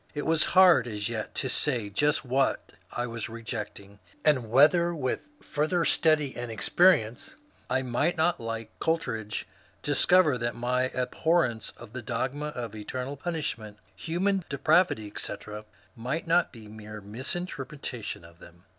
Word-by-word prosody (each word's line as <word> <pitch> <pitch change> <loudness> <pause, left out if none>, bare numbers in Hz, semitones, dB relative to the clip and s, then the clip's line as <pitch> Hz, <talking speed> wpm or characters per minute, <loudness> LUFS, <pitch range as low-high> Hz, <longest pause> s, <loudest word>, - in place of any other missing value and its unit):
It 145 - -3
was 160 -1 +2
hard 185 -8 +7
as 105 -1 -3
yet 110 -2 -4
to 130 - -1
say 125 -4 0
just 145 +6 +1
what 130 +2 0 0.2
I 120 - -2
was 115 -2 -5
rejecting, 105 -3 -7 0.3
and 130 -7 +3
whether 170 +7 +5
with 135 - -3
further 160 +3 0
study 155 -4 +3
and 120 -1 -5
experience 120 - +3 0.3
I 130 - +1
might 130 +8 0
not 165 +2 +2
like 115 -1 -5
Coleridge 125 -11 -1 0.4
discover 145 -1 +4
that 120 0 -2
my 125 +2 +1
abhorrence 130 -1 +1
of 120 -1 -12
the 130 - -5
dogmas 135 +6 -3
of 115 -4 -5
eternal 125 +6 -5
punishment, 140 -10 -4 0.2
human 185 - 0
depravity, 145 -3 +3
etc., 105 +1 -6 0.3
might 125 +7 -3
not 175 +1 +3
be 110 -3 -12
mere 105 0 -9
misinterpretation 130 - -5
of 85 0 -17
them. 85 +1 -16
125 Hz, 140 wpm, -28 LUFS, 110-155 Hz, 0.4 s, hard